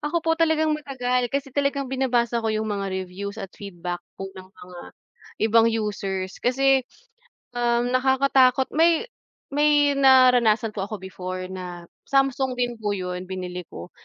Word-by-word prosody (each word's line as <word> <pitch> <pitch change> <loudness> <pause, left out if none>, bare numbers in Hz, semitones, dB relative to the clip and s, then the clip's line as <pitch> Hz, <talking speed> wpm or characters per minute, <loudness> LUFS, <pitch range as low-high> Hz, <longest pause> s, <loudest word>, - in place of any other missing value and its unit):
Ako 330 +2 -2
po 325 - +3
talagang 320 -1 +2
matagal 250 -4 -1
kasi 275 0 -3
talagang 280 -1 -1
binabasa 240 -3 +1
ko 225 - -2
yung 215 0 -1
mga 200 -1 -3 0.2
reviews 200 +3 -7
at 195 - -7
feedback 180 -4 -6 0.2
po 195 0 -7
ng 185 0 -12
mga 180 -2 -13 0.7
ibang 225 +1 +5
users 200 -4 -3
kasi, 270 +2 +3 0.8
um, 240 0 +1
nakakatakot 265 0 +3
may, 330 +4 +3 0.5
may 290 -1 +3
naranasan 250 -5 +5
po 195 -2 -4
ako 205 -2 -7
before 185 0 -6
na 180 -2 -8 0.2
Samsung 270 -1 +1
din 245 -1 -2
po 210 -2 -2
yun 180 -1 -5
binili 180 -1 -6
ko, 85 +1 -10
235 Hz, 145 wpm, -24 LUFS, 190-270 Hz, 0.8 s, ibang